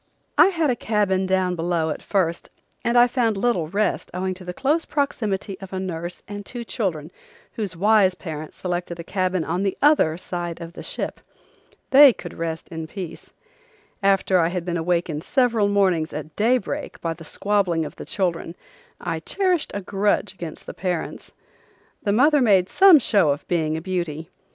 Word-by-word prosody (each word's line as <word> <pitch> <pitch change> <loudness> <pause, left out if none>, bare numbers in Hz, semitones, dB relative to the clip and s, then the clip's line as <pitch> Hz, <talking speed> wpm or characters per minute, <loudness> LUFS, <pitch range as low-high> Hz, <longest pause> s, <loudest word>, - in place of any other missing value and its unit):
I - - +7
had 330 -7 +1
a - - 0
cabin 200 -5 0
down 185 -1 +1
below 165 -1 0
at - - -5
first 180 -4 -1 0.3
and 235 +1 +2
I 240 - +8
found 240 -4 0
little 195 -7 +1
rest 205 +6 -1
owing 185 +1 -1
to 185 0 -11
the 180 - -5
close 295 - 0
proximity 210 -9 -2
of 195 -1 -10
a 190 - -2
nurse 175 -1 -5
and 205 0 -6
two 240 +4 -6
children 175 -9 -3 0.4
whose 200 -6 -4
wise 200 0 +4
parents 155 -4 -7
selected 175 -1 -3
a - - -5
cabin 185 -1 -1
on 175 +4 -2
the 195 -1 -1
other 285 - +4
side 175 -2 -5
of 170 0 -8
the - - -9
ship. - - -4 0.7
They 275 -1 +9
could 175 - -9
rest 165 -1 -4
in 160 -1 -6
peace. 180 -1 -8 0.7
After 195 -1 +3
I 165 - +3
had 175 0 -3
been 175 -1 -2
awakened 170 -2 -1
several 235 -6 +2
mornings 190 -6 +1
at 155 +1 -7
daybreak 235 +1 0
by 165 -1 -2
the 165 - -12
squabbling 180 -1 0
of - - -9
the - - -8
children 175 -3 -2 0.4
I 165 -1 -3
cherished 365 - 0
a 205 - -2
grudge 200 +2 0
against 170 -4 -8
the - - -7
parents. 180 -3 -4 0.7
The 205 - 0
mother 285 +7 +4
made 195 -6 +4
some 385 -4 +7
show 200 - +3
of 145 +1 -2
being 160 -3 0
a - - -5
beauty. 170 -3 -4
185 Hz, 180 wpm, -23 LUFS, 170-210 Hz, 0.7 s, They